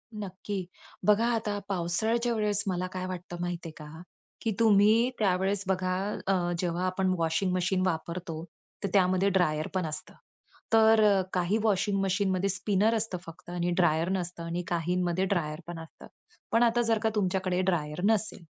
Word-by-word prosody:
नक्की. 195 -1 -5 0.4
बघा, 210 +2 +5
आता 210 -2 -2
पावसाळ्याच्या 220 +7 0
वेळेस 210 -2 0
मला 185 -1 -1
काय 185 0 -3
वाटतं 180 -1 -6
माहिती 175 -1 -3
आहे 155 - -12
का? 155 +1 -10 0.4
की 225 - 0
तुम्ही 220 +2 +5
त्यावेळेस 195 0 +1
बघा 185 -1 0 0.3
अ, 195 - +3 0.3
जेव्हा 175 +1 -1
आपण 185 0 +1
वॉशिंग 165 +3 0
मशीन 185 +1 +1
वापरतो, 165 -1 -3 0.4
तर 200 - 0
त्यामध्ये 185 0 +3
ड्रायर 155 -5 +1
पण 185 -3 0
असतं. 150 -1 -6 0.6
तर 220 -3 +5
काही 180 +3 +1
वॉशिंग 205 -1 +1
मशीनमध्ये 195 0 +1
स्पिनर 205 +3 +1
असतं 220 -4 -2
फक्त 165 +1 -12
आणि 175 0 -1
ड्रायर 170 -1 +2
नसतं 175 -2 -3
आणि 170 +1 -3
काहींमध्ये 175 +2 0
ड्रायर 160 -6 -1
पण 175 -1 -6
असतं. 160 - -12 0.4
पण 230 +2 +4
आता 240 0 +3
जर 225 -1 +2
का 220 - +3
तुमच्याकडे 185 -2 0
ड्रायर 150 -2 -2
नसेल, 215 -4 0
185 Hz, 155 wpm, -28 LUFS, 175-205 Hz, 0.6 s, बघा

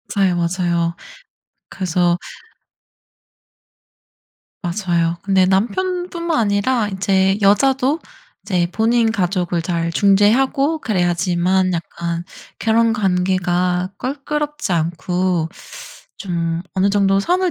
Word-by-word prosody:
맞아요, 190 -3 +2
맞아요. 170 -1 0 0.7
그래서 175 -2 0 2.4
맞아요. 175 -2 -1
근데 190 -2 +3
남편뿐만 340 - -1
아니라 215 +2 +1
인제 190 0 +1
여자도 265 +8 +3 0.4
이제 180 -4 0
본인 225 +1 +2
가족을 180 -4 -1
잘 170 -1 -2
중재하고 235 - +3
그래야지만 180 - +1
약간 170 0 -4 0.4
결혼 230 0 +2
관계가 180 -2 0
껄끄럽지 295 -2 -3
않고 175 +1 -1 0.7
좀 170 -3 -3
어느 190 +1 +2
정도 195 -1 +2
선을 360 - +1
190 Hz, 215 characters per minute, -19 LUFS, 175-225 Hz, 2.4 s, 근데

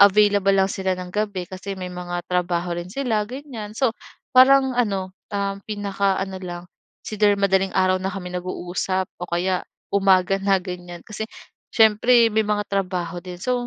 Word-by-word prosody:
available 200 -1 +5
lang 195 0 +3
sila 190 -1 -1
ng 180 -1 -6
gabi, 205 -3 -1
kasi 195 +1 -6
may 185 - -5
mga 175 0 -4
trabaho 175 -1 0
rin 175 - -5
sila, 230 -6 0
ganyan. 250 -6 -7
So, 260 +1 +2 0.4
parang 265 +1 +7
ano, 195 -5 0 0.2
um, 200 0 -1
pinakaano 195 -2 -1
lang, 175 -1 -6 0.5
either 210 -1 +3
madaling 195 -1 +2
araw 185 0 +3
na 190 - -3
kami 180 -1 -6
nag-uusap 185 +1 -2
o 180 - -4
kaya 180 +2 0 0.3
umaga 195 -1 +4
na 195 0 +3
ganyan. 180 -1 -7
Kasi 220 0 -5 0.5
syempre 230 +2 +5
may 220 0 +2
mga 210 0 +1
trabaho 180 -3 -2
din. 180 -1 -8
So, 250 -1 0
195 Hz, 160 wpm, -23 LUFS, 180-210 Hz, 0.5 s, parang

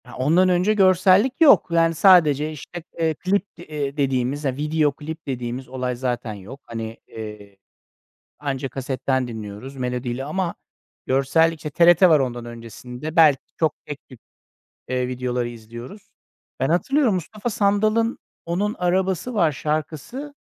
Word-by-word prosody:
Ya, - - -12
ondan 165 +8 +3
önce 180 +4 +3
görsellik 190 +4 +4
yok. 305 -4 +7
Yani, 165 0 +3
sadece 155 -5 +5
işte, 155 +3 -9 0.2
eee, 160 -1 +2
klip, 190 +5 0
eee, 150 -4 -5
dediğimiz, 135 +1 0
video 150 +3 +1
klip 155 +3 -8
dediğimiz 125 0 -4
olay 125 -1 -3
zaten 120 -3 -3
yok. 105 +7 -10
Hani, 115 -1 -6
eee, 105 -2 -9 0.8
anca 135 -2 -3
kasetten 130 -1 -2
dinliyoruz 110 +4 -8
melodiyle 125 0 -3
ama 170 +4 -2 0.5
görsellik, 160 +5 +2
işte, 150 - -6
TRT 175 +4 +6
var 155 -3 +5
ondan 120 -2 -3
öncesinde. 125 +5 -8
Belki 155 -5 +6 0.2
çok 160 -2 +1
tek 145 -1 -8
tip, 130 -4 -14 0.7
eee, 125 -1 -1
videoları 125 -1 -2
izliyoruz. 120 - -11 0.5
Ben 135 - 0
hatırlıyorum, 250 - +2
Mustafa 210 +6 -4
Sandal'ın 215 +3 +1 0.3
"Onun 195 +5 -1
Arabası 185 +5 0
Var" 170 -8 +3
şarkısı, 155 - -4
150 Hz, 135 wpm, -22 LUFS, 125-180 Hz, 0.8 s, yok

